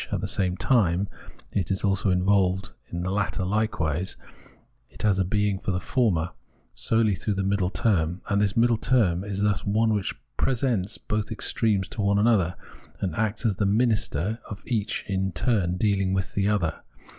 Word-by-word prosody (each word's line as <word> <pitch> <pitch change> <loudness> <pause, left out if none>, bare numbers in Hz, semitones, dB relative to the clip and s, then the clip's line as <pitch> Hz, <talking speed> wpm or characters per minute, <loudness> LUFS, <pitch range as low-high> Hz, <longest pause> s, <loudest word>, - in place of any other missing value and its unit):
at - - 0
the - - -3
same 90 -1 0
time, 100 -6 +2 0.4
is 95 -1 -1
also 100 0 +1
involved 95 0 +2 0.2
that 85 0 -3
the 95 - -2
latter 100 -1 -1
hke 105 +4 +1
^nse 80 +2 -2 0.9
has 100 -3 +3
a - - +3
being 105 +1 0
for - - -5
the 90 -1 0
former, 95 -9 +1 0.4
solely 110 -2 +2
through 100 +3 -2
that 95 0 -1
middle 100 -2 +1
term; 90 -3 +1
and 100 0 +1
this 100 -1 +1
naiddle 115 -1 +2
term 105 -8 +2
is 100 -1 -3
thus 105 -1 +1
one 110 +2 +2
which 100 -3 -1 0.2
presents 115 -6 0
both 105 -1 -3
extremes 105 -2 0
to 110 - -5
one 100 0 +2
another, 105 -5 +3 0.4
and 90 -5 -2
acts 110 +3 -1
as 105 -5 +1
the 100 - +1
minister 110 -3 +1
of 100 0 -8
each 110 -3 -2
in 95 -1 -1
turn 95 -2 +1
in - - -3
deahng 100 -2 +1
with 95 -1 -2
the 100 0 +1
other. 100 -6 0
100 Hz, 180 wpm, -26 LUFS, 95-110 Hz, 0.9 s, has